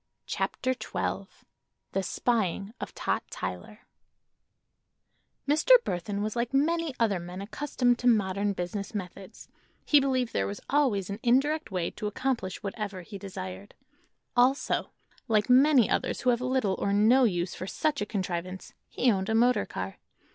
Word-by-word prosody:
CHAPTER 260 0 -1
XII 255 - -3 0.6
THE 195 - 0
SPYING 200 0 -1
OF - - -6
TOT - - -2
TYLER - - -6 1.7
Mr. 310 - +5
Burthon 200 +3 -3
was 215 +1 -3
like 240 +2 -1
many 325 0 +1
other 210 -5 +2
men 175 +2 -7
accustomed 245 +3 0
to 250 - 0
modern 200 -3 +2
business 195 +4 -4
methods: 195 +1 -7 0.4
he 295 - +6
believed 260 -3 0
there 95 - 0
was 100 - -5
always 235 -10 +2
an 200 - -5
indirect 285 +5 +2
way 180 -4 -2
to 210 - -5
accomplish 225 -3 -2
whatever 200 -2 -4
he 200 +3 -9
desired. 190 0 -8 0.6
Also, 255 +3 +2 0.4
like 215 +1 +2
many 265 -2 +6
others - - -1
who 250 - +3
have 240 0 0
little 255 -6 +1
or 200 - 0
no 225 +6 +5
use 175 -4 0
for 185 - -6
such 300 +6 -1
a - - 0
contrivance, 185 -2 -4 0.2
he 250 - +2
owned 190 0 -1
a 220 - +1
motor 245 +2 +3
car. - - -6
215 Hz, 150 wpm, -28 LUFS, 190-255 Hz, 1.7 s, he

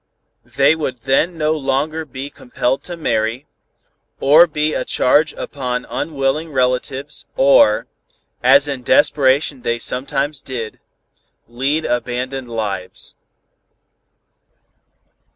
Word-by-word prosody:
They 140 +3 +4
would 130 -6 -4
then 150 +7 +1
no 155 -1 +1
longer 150 +2 -1
be 135 0 -7
compelled 125 +1 -2
to 175 -1 -6
marry, 115 -3 -1 0.7
or 155 +5 +6
be 155 0 -1
a - - -1
charge 150 +4 +2
upon 125 -3 -4
unwilling 150 +1 -2
relatives 130 +2 -1
or, 135 -6 +5 0.6
as 140 +3 +5
in 140 -3 -4
desperation 135 +1 +2
they 115 0 -1
sometimes 135 +4 -2
did, 115 -6 -6 0.7
lead 135 +7 -1
abandoned 125 +1 -3
lives. 105 -5 -4
135 Hz, 100 wpm, -18 LUFS, 125-150 Hz, 0.7 s, or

